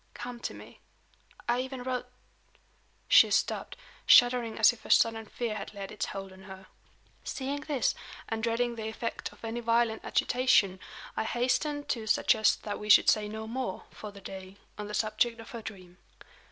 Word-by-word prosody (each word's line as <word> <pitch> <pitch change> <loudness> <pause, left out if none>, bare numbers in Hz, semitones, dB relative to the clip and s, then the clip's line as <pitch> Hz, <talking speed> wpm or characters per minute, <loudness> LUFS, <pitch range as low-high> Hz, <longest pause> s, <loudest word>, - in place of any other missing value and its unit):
Come 245 0 -7
to - - -5
me.' - - -13 0.7
I 240 +1 +2
even 260 -1 -6
wrote 250 -1 -3 0.5
" - - -38
She - - +7
stopped, - - 0 0.3
shuddering 245 -2 +6
as 220 +2 +6
if 235 - -16
a - - -11
sudden 225 -1 +3
fear 235 -1 -3
had 215 0 -7
laid 195 -1 -6
its 210 - -3
hold 195 -1 -7
on 190 - -15
her. 190 0 -11 0.6
Seeing 275 +2 -3
this, 290 -5 0 0.3
and 225 0 -3
dreading 235 +1 0
the 220 -1 -4
effect 225 +1 -4
of - - -12
any 225 +1 -3
violent 230 -1 +1
agitation, 215 -7 +2 0.4
I - - 0
hastened 290 +5 0
to 225 -3 -2
suggest 215 0 +3
that 205 -1 -4
we 210 - -7
should - - +8
say 215 -1 0
no 220 +1 -6
more, 235 -3 -4
for 210 - -9
that 200 -1 -14
day, 190 0 -9 0.2
on 210 -1 -6
the 210 - -5
subject 230 +2 0
of 225 - -11
her 235 - -6
dream. 185 -5 -10
225 Hz, 180 wpm, -29 LUFS, 210-245 Hz, 0.7 s, should